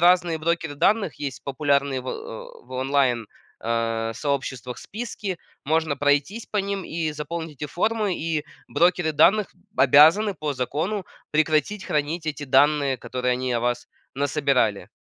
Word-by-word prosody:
разные 175 -1 +4
брокеры 165 -2 -1
данных 195 - +2
есть 140 -3 -5
популярные 140 -1 +1
в 130 - -8
о - - -7
в - - -23
онлайн, 130 -4 +1 0.3
э, 115 0 -1
сообществах, 135 -3 -3
списки. 210 -4 -5 0.3
Можно 155 0 +1
пройтись 145 - +1
по 210 - -5
ним, 200 -1 -1
и 160 -2 -2
заполнить 150 0 -6
эти - - -1
формы, 210 +4 0
и 160 -2 -1 0.2
брокеры 175 -2 +2
данных 205 +7 +4 0.2
обязаны, 160 +10 +6
по 155 -2 -3
закону, 160 - -2 0.2
прекратить 155 +6 +1
хранить 155 +1 -1
эти 150 -1 -3
данные, 140 0 +3
которые 125 +1 -2
они 130 0 -2
о 120 - +1
вас 120 0 -1 0.3
насобирали. 140 -6 +1
150 Hz, 140 wpm, -24 LUFS, 135-175 Hz, 0.3 s, обязаны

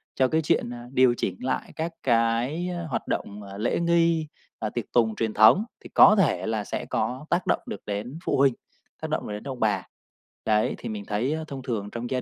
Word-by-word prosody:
cho 130 - +3
cái 160 +5 +1
chuyện, 150 - +1
à, 120 0 -9
điều 130 -2 +5
chỉnh 95 - -1
lại 130 - -2
các 165 +1 -3
cái 120 +8 +1 0.2
hoạt 130 - -3
động, 105 +1 -3
à, 100 0 -9
lễ 110 +3 0
nghi, 170 -2 +2 0.3
à, 110 - -2
tiệc 120 0 -4
tùng 110 -3 +3
truyền 110 -1 -1
thống 110 - +6 0.2
thì - - -10
có 210 - +8
thể 170 -7 +2
là 110 -2 -1
sẽ - - -4
có 130 +4 -2
tác 175 +1 0
động - - +2
được 100 - -6
đến 110 +9 -4
phụ - - +1
huynh, 135 -1 +4 0.5
tác - - -4
động - - -2
được 105 - -4
đến 105 - -6
ông 135 -3 -6
bà. 105 -2 0 0.6
Đấy, 105 0 +2
thì - - -6
mình 105 -2 -5
thấy 110 +8 -1
á 160 0 -3
thông 135 -1 -6
thường 110 -5 -3
trong 120 +1 -5
gia 130 -1 -1
120 Hz, 225 wpm, -26 LUFS, 110-150 Hz, 0.6 s, có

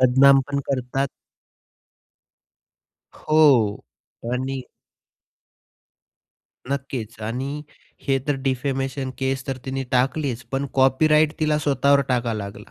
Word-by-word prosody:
बदनाम 135 +2 +6
पण 140 - 0
करतात. 135 +1 -1 2.1
हो 140 -10 +3 0.5
आणि 130 +1 -2 2.1
नक्कीच 125 -6 -4
आणि 135 +7 -4 0.4
हे 135 -1 +2
तर 145 - +3
डिफेमेशन 135 0 -2
केस 135 -1 -2
तर 135 -1 -2
तिने 135 0 -3
टाकलीच, 130 -1 0
पण 135 +1 -1
कॉपीराईट 150 +3 +4
तिला 155 -1 +2
स्वतःवर 140 -1 +3
टाकावा 120 -3 0
लागला. 100 +1 -7
135 Hz, 95 wpm, -23 LUFS, 125-140 Hz, 2.1 s, बदनाम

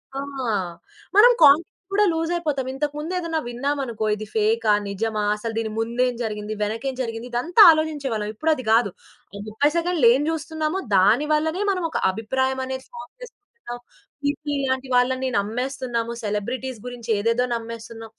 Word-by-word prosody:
ఆ! - - -2 1.0
మనం 455 +4 +8
కాంటెంట్ 295 +2 +7 0.3
కూడా 415 +1 +4
లూజ్ 325 +1 -1
అయిపోతాం. 295 -6 -2
ఇంతకు 290 +2 -2
ముందెదన్నా 335 0 -2
విన్నామనుకో 245 -2 -2
ఇది 215 +1 -7
ఫేకా? 220 0 +2 0.2
నిజమా? 210 +2 -2
అసలు 225 +2 -5
దీని 225 -1 -2
ముందు 235 +2 -1
ఏం 250 - -3
జరిగింది? 210 -1 -4
వెనకేం 230 +6 -3
జరిగింది? 230 -1 -4
ఇదంతా 330 - +3
ఆలోచించేవాళ్ళం. 285 -9 -1
ఇప్పుడు 320 +8 +1
అది 255 - -7
గాదు. 225 -3 +4 0.4
ఆ - - -6
30 220 +8 +1
సెకండ్‌లు 340 -6 +2
ఏం 265 - +1
జూస్తున్నామో 315 +2 -2 0.2
దానివల్లనే 300 - +2
మనం 365 -3 -2
ఒక - - -2
అభిప్రాయం 260 +6 -1
అనేది 260 0 -5
ఫార్మ్ 315 0 -10
చేసుకుంటున్నాం. 415 - -11 0.4
కీర్కి 290 +1 -2
లాంటి 260 0 -1
వాళ్ళని 260 +1 +2
నమ్మేస్తున్నాము. 240 +2 -3
సెలబ్రిటీస్ 235 +4 -3
గురించి 245 -2 -8
ఏదేదో 230 +4 +1
నమ్మేస్తున్నాం. 230 -1 -8
255 Hz, 145 wpm, -23 LUFS, 225-305 Hz, 1.0 s, మనం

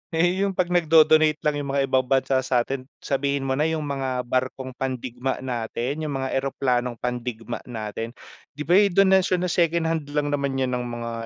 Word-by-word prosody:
eh, 175 +3 +2
yung 195 - -1
'pag 180 -1 +1
nagdo-donate 155 -2 +5
lang 150 -1 +2
yung 140 -1 -4
mga 140 -1 +2
ibang 130 -1 +2
bansa 135 0 +2
satin 130 +1 0 0.2
sabihin 140 0 0
mo 130 - 0
na 150 - +2
yung 160 -1 -1
mga 130 -3 -2
barkong 130 +1 -2
pandigma 130 0 -3
natin, 125 +3 -3
yung 145 -2 -3
mga 130 0 -3
eroplanong 125 -2 0
pandigma 120 -2 -4
natin 115 0 -5 0.4
'di 150 - -5
ba, - - +5
eh, 205 - +6
donasyon 190 -1 +4
na 180 - -1
second-hand 165 -2 +1
lang 145 -1 0
naman 140 -1 -1
yun 130 -1 0
ng 125 0 -2
mga 120 -1 -5
135 Hz, 180 wpm, -24 LUFS, 125-155 Hz, 0.4 s, eh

